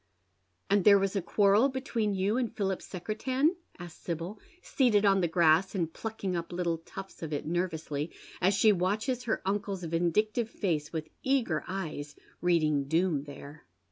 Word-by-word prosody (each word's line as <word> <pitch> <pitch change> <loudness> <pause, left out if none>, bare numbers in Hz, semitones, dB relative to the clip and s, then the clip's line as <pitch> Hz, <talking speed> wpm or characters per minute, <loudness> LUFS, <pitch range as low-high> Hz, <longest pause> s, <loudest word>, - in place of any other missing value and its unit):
" 90 -1 -45
And 200 -1 +4
there 200 +1 +8
was 195 +1 0
a 195 - +1
quarrel 205 +7 +4
between 240 -6 -1
you 195 +3 +1
and 245 -2 0
Philip 195 -5 -2
Secretan? 255 - -1
" - - -28
asks 175 -2 -10
Sibyl, 170 +4 -5 0.2
seated 220 -6 +3
on 195 -1 +4
the 175 - +2
grass 170 +3 +3
and 165 -4 -1
plucking 215 -5 -4
up 170 0 -4
little 175 -2 -1
tufts 195 +4 -10
of 160 -2 -5
it 145 - -3
nervously, 160 -3 -2 0.3
as 190 +2 +3
she 215 +1 +5
watches 215 +7 0
her 225 - -1
uncle's 195 -1 -2
vindictive 175 +8 0
face 160 -10 -2
with 160 -2 -4
eager 235 - +1
eyes, 155 -6 -5 0.3
reading 155 -5 +2
doom 160 -1 +1
there. 145 - -11
185 Hz, 170 wpm, -30 LUFS, 165-210 Hz, 0.3 s, there